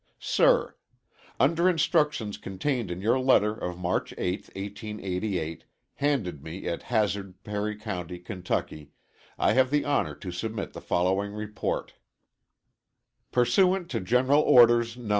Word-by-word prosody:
Sir: -, -, +2 dB, 0.6 s
Under 170 Hz, +2 st, +4 dB
instructions 150 Hz, -, +1 dB
contained 115 Hz, +3 st, -2 dB
in 90 Hz, +1 st, -5 dB
your 115 Hz, +6 st, +2 dB
letter 115 Hz, -5 st, +4 dB
of 90 Hz, -5 st, -5 dB
March 90 Hz, 0 st, -2 dB
8th, 90 Hz, +3 st, -3 dB
1888, 95 Hz, -4 st, -4 dB, 0.3 s
handed 120 Hz, -, -1 dB
me 80 Hz, +5 st, -7 dB
at 85 Hz, -, -2 dB
Hazard, 100 Hz, -5 st, -1 dB
Perry 105 Hz, 0 st, -3 dB
County, 90 Hz, -5 st, -5 dB
Kentucky, 90 Hz, -4 st, -4 dB, 0.4 s
I -, -, +3 dB
have 130 Hz, 0 st, +4 dB
the 145 Hz, +1 st, +1 dB
honor 135 Hz, -, 0 dB
to 90 Hz, -, -7 dB
submit 105 Hz, +3 st, -4 dB
the -, -, -8 dB
following 95 Hz, +3 st, 0 dB
report: 105 Hz, 0 st, -4 dB, 1.4 s
Pursuant 175 Hz, +9 st, +2 dB
to 115 Hz, -, -1 dB
General 125 Hz, +9 st, +3 dB
Orders 120 Hz, -3 st, +5 dB
Nos. 120 Hz, -4 st, -8 dB
105 Hz, 125 wpm, -27 LUFS, 90-130 Hz, 1.4 s, Orders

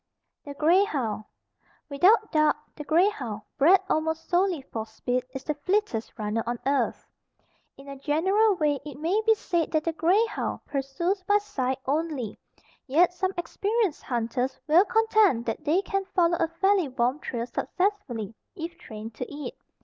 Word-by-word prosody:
THE 285 Hz, -1 st, -7 dB
GREY 340 Hz, +7 st, +4 dB
HOUND. 225 Hz, -, -2 dB, 0.6 s
Without 380 Hz, +10 st, +4 dB
doubt, 305 Hz, -1 st, +4 dB, 0.2 s
the 300 Hz, -, -7 dB
grey 335 Hz, +6 st, +4 dB
hound, 230 Hz, -, -6 dB, 0.2 s
bred 350 Hz, +7 st, +6 dB
almost 320 Hz, +1 st, -1 dB
solely 360 Hz, -4 st, +1 dB
for 220 Hz, -, -3 dB
speed, 245 Hz, +3 st, -2 dB
is 265 Hz, 0 st, -7 dB
the 300 Hz, -, -1 dB
fleetest 300 Hz, -, -1 dB
runner 215 Hz, +1 st, -1 dB
on 240 Hz, 0 st, -1 dB
earth. 275 Hz, +1 st, 0 dB, 0.7 s
In 275 Hz, -, -13 dB
a 275 Hz, 0 st, -7 dB
general 380 Hz, +9 st, +2 dB
way 295 Hz, -4 st, +1 dB
it 295 Hz, -3 st, -8 dB
may 355 Hz, +8 st, +1 dB
be 445 Hz, -, +6 dB
said 345 Hz, -5 st, -1 dB
that 310 Hz, -1 st, +2 dB
the 330 Hz, -, -1 dB
grey 365 Hz, +8 st, +3 dB
hound 450 Hz, -, -4 dB
pursues 290 Hz, +8 st, -2 dB
by 410 Hz, -, +5 dB
sight 265 Hz, -11 st, -2 dB
only, 285 Hz, -6 st, -2 dB, 0.5 s
yet 335 Hz, +6 st, +4 dB
some 375 Hz, +1 st, -1 dB
experienced 400 Hz, +1 st, -1 dB
hunters 245 Hz, +2 st, -2 dB
will 330 Hz, +6 st, +5 dB
contend 435 Hz, -, +3 dB
that 230 Hz, +6 st, -3 dB
they 340 Hz, +6 st, +2 dB
can 390 Hz, 0 st, -1 dB
follow 345 Hz, -3 st, +2 dB
a 330 Hz, -, +2 dB
fairly 375 Hz, +1 st, +2 dB
warm 255 Hz, +2 st, 0 dB
trail 235 Hz, -6 st, -3 dB
successfully, 260 Hz, -, -2 dB, 0.2 s
if 340 Hz, +1 st, -6 dB
trained 220 Hz, +1 st, -8 dB
to 245 Hz, +3 st, -6 dB
it. 290 Hz, 0 st, -6 dB
310 Hz, 165 wpm, -26 LUFS, 260-375 Hz, 0.7 s, bred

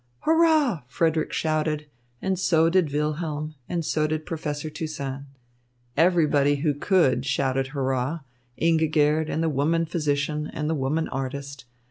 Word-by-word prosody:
"Hurrah!" 315 Hz, -, +3 dB
Frederick 160 Hz, +4 st, 0 dB
shouted, 155 Hz, -1 st, -1 dB, 0.4 s
and 190 Hz, -1 st, 0 dB
so 165 Hz, -3 st, +3 dB
did 180 Hz, -5 st, +2 dB
Wilhelm 150 Hz, +1 st, -2 dB, 0.2 s
and 170 Hz, -2 st, -2 dB
so 155 Hz, 0 st, +1 dB
did 155 Hz, 0 st, -3 dB
Professor 155 Hz, -2 st, -4 dB
Toussaint. 140 Hz, -3 st, -5 dB, 0.7 s
Everybody 150 Hz, -4 st, +3 dB
who 145 Hz, +1 st, 0 dB
could 145 Hz, -5 st, +2 dB
shouted 135 Hz, -1 st, 0 dB
"Hurrah!" 135 Hz, +2 st, -2 dB, 0.4 s
Ingigerd 155 Hz, -1 st, +2 dB
and 160 Hz, -, -1 dB
the -, -, +2 dB
woman 160 Hz, +3 st, +1 dB
physician 150 Hz, -2 st, -1 dB
and 150 Hz, -, -2 dB
the 160 Hz, -, +1 dB
woman 150 Hz, +3 st, -1 dB
artist. 135 Hz, 0 st, -5 dB
155 Hz, 130 wpm, -25 LUFS, 140-165 Hz, 0.7 s, Hurrah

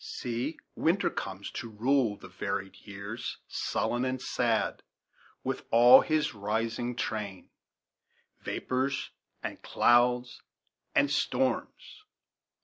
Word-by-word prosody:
"See, 125 Hz, +6 st, -3 dB, 0.2 s
Winter 175 Hz, +5 st, +2 dB
comes, 95 Hz, +1 st, -5 dB
to 115 Hz, -, -5 dB
rule 115 Hz, 0 st, +1 dB
the -, -, -11 dB
varied 95 Hz, -1 st, -4 dB
years, 100 Hz, +3 st, -6 dB
Sullen 120 Hz, +1 st, -1 dB
and 130 Hz, 0 st, -1 dB
sad, -, -, 0 dB, 0.6 s
with -, -, -2 dB
all 120 Hz, +3 st, +9 dB
his 155 Hz, -1 st, 0 dB
rising 115 Hz, +3 st, -2 dB
train; 105 Hz, -6 st, -4 dB, 0.9 s
Vapors, 130 Hz, +1 st, -2 dB, 0.3 s
and -, -, -5 dB
clouds, 120 Hz, 0 st, +3 dB, 0.5 s
and 140 Hz, 0 st, +4 dB
storms." 265 Hz, -, -1 dB
120 Hz, 100 wpm, -30 LUFS, 105-130 Hz, 0.9 s, all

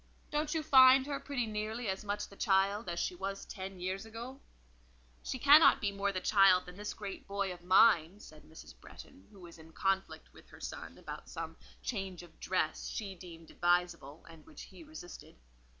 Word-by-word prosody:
Don't 300 Hz, +1 st, -1 dB
you 315 Hz, -, -1 dB
find 260 Hz, -1 st, +7 dB
her 280 Hz, -1 st, -3 dB
pretty 265 Hz, -5 st, -3 dB
nearly 215 Hz, +2 st, -4 dB
as 190 Hz, +1 st, -3 dB
much 205 Hz, 0 st, -3 dB
the 200 Hz, -, -15 dB
child 195 Hz, +1 st, +1 dB
as 170 Hz, 0 st, -3 dB
she -, -, -1 dB
was 195 Hz, +2 st, -5 dB
ten 190 Hz, -1 st, -8 dB
years 185 Hz, +2 st, -3 dB
ago?" 235 Hz, +4 st, -9 dB, 0.8 s
"She -, -, -4 dB
cannot 290 Hz, +5 st, +7 dB
be 205 Hz, -2 st, -1 dB
more 200 Hz, 0 st, -1 dB
the 185 Hz, -, -3 dB
child 195 Hz, -2 st, +4 dB
than 180 Hz, -, -11 dB
this 210 Hz, +2 st, -6 dB
great 200 Hz, -2 st, -8 dB
boy 200 Hz, -1 st, -2 dB
of 175 Hz, -1 st, -14 dB
mine," 185 Hz, -1 st, +4 dB
said 155 Hz, -6 st, -14 dB
Mrs. 160 Hz, 0 st, -13 dB
Bretton, 95 Hz, +2 st, -14 dB
who 200 Hz, -, -17 dB
was 170 Hz, -1 st, -13 dB
in 160 Hz, 0 st, -15 dB
conflict 195 Hz, 0 st, -2 dB
with -, -, -18 dB
her -, -, -15 dB
son -, -, -8 dB
about -, -, -9 dB
some -, -, -6 dB, 0.3 s
change 195 Hz, -6 st, -4 dB
of 170 Hz, -2 st, -17 dB
dress 180 Hz, -4 st, -2 dB
she 200 Hz, -3 st, -5 dB
deemed 170 Hz, -3 st, -13 dB
advisable, 175 Hz, -4 st, -1 dB
and 165 Hz, -1 st, -14 dB
which 315 Hz, -, -12 dB
he -, -, -13 dB
resisted. 305 Hz, -, -11 dB
195 Hz, 190 wpm, -32 LUFS, 180-225 Hz, 0.8 s, find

